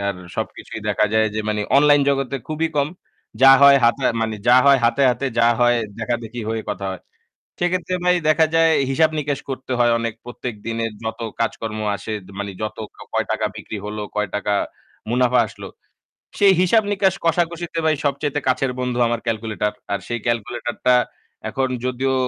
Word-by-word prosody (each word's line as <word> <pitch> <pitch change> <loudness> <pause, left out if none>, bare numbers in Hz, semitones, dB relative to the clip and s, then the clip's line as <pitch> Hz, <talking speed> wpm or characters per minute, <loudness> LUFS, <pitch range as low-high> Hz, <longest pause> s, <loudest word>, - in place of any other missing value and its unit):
আর 100 - -3 0.2
সবকিছুই 110 - -5
দেখা 105 +1 +2
যায় 110 0 +3
যে 110 - -1
মানে 105 -1 0
online 145 0 +5
জগতে 135 -1 0
খুবই 160 +1 -1
কম। 145 0 +2 0.5
যা 135 - +10
হয় 140 0 +9
হাতে 120 +3 +2 0.2
মানে 110 -1 -1
যা 125 - +7
হয় 140 -1 +7
হাতে, 120 +4 +2
হাতে, 125 +3 -2
যা 115 - +5
হয় 120 0 +4 0.2
দেখাদেখি 120 0 -3
হয়ে 115 0 -2
কথা 100 -1 -4
হয়। 95 - -7 0.6
সেক্ষেত্রে 180 +1 0
ভাই 180 0 +4
দেখা 155 +1 +4
যায় 165 0 +5 0.2
হিসাব 155 +4 +3
নিকাশ 145 -2 -2
করতে 130 0 -5
হয় 120 -1 +4
অনেক। 115 -1 -3
প্রত্যেকদিনের 115 -2 -4
যত 110 +1 -4 0.2
কাজকর্ম 115 -1 -2 0.2
আসে 110 - -7 0.3
মানে 100 -1 -4
যত 110 - -4 0.2
কাও - - -12
কয় - - +1
টাকা - - 0
বিক্রি 110 - -7
হলো, 105 0 -5
কয় 105 -1 0
টাকা 105 0 -1 0.6
মুনাফা 125 +1 +3
আসলো? - - -10 0.7
সেই 200 -1 +6
হিসাব 215 +5 +4
নিকাশ 195 -1 +2
কষাকষিতে 170 0 0
ভাই 155 -1 +3
সবচাইতে 145 +1 -1
কাছের 130 0 +1
বন্ধু 125 -1 -2
আমার 120 0 -1
calculator। 110 -2 -1 0.2
আর 100 - -1
সেই 120 0 -3
calculator 120 +1 -2
টা 125 - +6 0.5
এখন 135 -1 -1 0.2
যদিও 130 +1 0
125 Hz, 170 wpm, -21 LUFS, 110-145 Hz, 0.7 s, যা